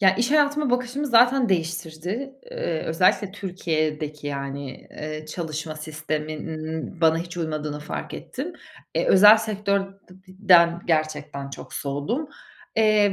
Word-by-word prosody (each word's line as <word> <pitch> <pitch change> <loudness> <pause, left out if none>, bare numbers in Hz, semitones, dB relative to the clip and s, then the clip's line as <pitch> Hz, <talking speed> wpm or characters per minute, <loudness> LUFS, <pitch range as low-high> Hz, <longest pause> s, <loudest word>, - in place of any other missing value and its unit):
Ya, 190 -1 +6
iş 240 +3 +1
hayatıma 295 -2 +3
bakışımı 250 +4 -1
zaten 245 +1 +5
değiştirdi. 175 - -2 0.2
Eee, 170 - -2
özellikle 185 +4 +2
Türkiye'deki, 155 -6 -2
yani, 140 -1 -5
eee, 155 0 -6
çalışma 155 -1 -5
sisteminin 155 +1 -5
bana 160 -1 +4
hiç 170 +1 -6
uymadığını 155 -3 -3
fark 150 - -5
ettim. 305 +7 -6 0.4
E, - - +1
özel 210 +3 +9
sektör 205 -2 0
de 195 0 -18
di 185 +1 -17 0.3
den 170 -1 +7
gerçekten 150 -3 -1
çok - - -9
soğudum. 145 - -2 0.5
Eee, 215 -2 +4
170 Hz, 130 wpm, -24 LUFS, 155-215 Hz, 0.5 s, özel